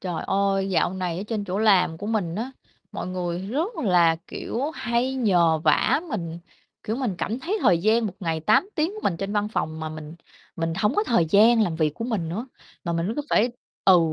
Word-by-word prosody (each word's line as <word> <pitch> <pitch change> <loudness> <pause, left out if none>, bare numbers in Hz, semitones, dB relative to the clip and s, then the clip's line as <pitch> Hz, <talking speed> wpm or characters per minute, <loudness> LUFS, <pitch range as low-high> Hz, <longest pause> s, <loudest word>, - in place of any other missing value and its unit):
Trời 180 -3 -3
ơi, 195 0 +1
dạo 185 0 +1
này 180 -3 -2
ở - - -3
trên 215 -3 -2
chỗ 185 0 -3
làm 190 -6 +3
của 205 - -6
mình 205 -7 -1
á, 235 +6 -3 0.4
mọi - - -4
người 180 -1 -3
rất 290 - -3
là, 175 -5 +3
kiểu, 270 +6 -3
hay 240 +3 -1
nhờ 175 -10 +3
vả 155 - +3
mình, 170 -7 -4 0.4
kiểu, 220 +3 -2
mình 250 -8 -1
cảm 230 +4 -2
thấy 385 +9 -2
thời 180 -8 +4
gian 220 +4 +2
1 200 - -4
ngày 165 -3 -1
8 215 - +3
tiếng 315 +3 +1
của 430 - -7
mình 175 - 0
trên 195 +3 -4
văn 210 0 0
phòng 160 -7 -3
mà 160 - -3
mình 155 0 -8 0.4
mình 165 0 -1
hổng 210 - +1
có 420 - +2
thời 225 - +3
gian 225 +4 +6
làm 175 -6 -1
việc 155 -2 +1
của 230 - -5
mình 215 -9 -2
nữa, 210 +10 -4 0.4
mà 170 - -1
mình 170 +5 -1
cứ 295 - -1
phải 235 +4 +4 0.4
ừ, 185 -2 +7
195 Hz, 220 wpm, -24 LUFS, 170-225 Hz, 0.4 s, ừ